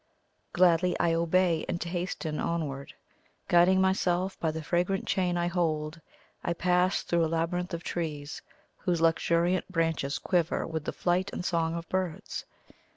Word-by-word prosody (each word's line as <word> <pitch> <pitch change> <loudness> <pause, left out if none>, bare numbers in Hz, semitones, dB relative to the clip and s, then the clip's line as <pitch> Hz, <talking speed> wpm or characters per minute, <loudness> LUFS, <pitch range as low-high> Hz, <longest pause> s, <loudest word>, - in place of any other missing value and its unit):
Gladly 180 0 +3
I 170 -1 +3
obey, 170 0 +2
and 175 - -1
hasten 170 -3 -3
onward. 145 -5 -3 0.6
Guiding 175 +2 +5
myself 190 0 +1
by 160 - 0
the 160 0 -4
fragrant 180 +4 0
chain 180 -2 0
I 175 - +1
hold, 165 -2 -1 0.4
I 170 - 0
pass 180 +2 +2
through 170 -1 +1
a - - +2
labyrinth 175 +3 -1
of 165 - -7
trees, 150 -4 -4 0.4
whose 175 -2 -1
luxuriant 170 +3 +2
branches 165 -5 0
quiver 175 -3 0
with 160 -2 -4
the - - -1
flight 180 +2 0
and 180 - -5
song 165 -2 0
of 170 0 -5
birds. 185 -3 -3
170 Hz, 150 wpm, -29 LUFS, 165-180 Hz, 0.6 s, Guiding